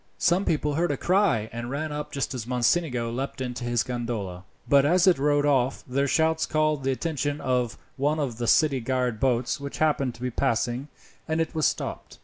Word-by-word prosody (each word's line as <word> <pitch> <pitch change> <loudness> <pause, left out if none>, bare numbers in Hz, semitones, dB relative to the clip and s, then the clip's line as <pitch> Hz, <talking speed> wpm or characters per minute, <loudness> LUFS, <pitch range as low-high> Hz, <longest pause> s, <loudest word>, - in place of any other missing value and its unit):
Some 175 +3 +2
people 150 -2 0
heard 170 +4 +1
a 145 - -1
cry 180 - +2
and 120 +1 -5
ran 150 +3 -3
up 150 0 -5
just 140 -1 -2
as 120 -3 -5
Mocenigo 125 -1 +1
leapt 135 +3 -4
into 125 -1 -4
his 120 -1 +1
gondola, 115 -7 -4 0.2
but 140 -1 +5
as 175 +5 +4
it 185 -6 +4
rowed 145 0 +2
off 135 -2 +1
their 140 +2 0
shouts 160 +2 +2
called 155 -2 +1
the 135 - +1
attention 145 0 -2
of 125 -2 -1 0.2
one 145 +3 +1
of 125 -6 -3
the 120 - -1
city 140 +2 +4
guard 125 -2 -1
boats 125 +3 +1
which 140 0 -6
happened 140 -5 +1
to - - -15
be 125 - -1
passing, 120 +1 0 0.4
and 160 0 0
it 165 - -1
was 155 -2 +2
stopped. - - -4
135 Hz, 200 wpm, -26 LUFS, 120-155 Hz, 0.4 s, but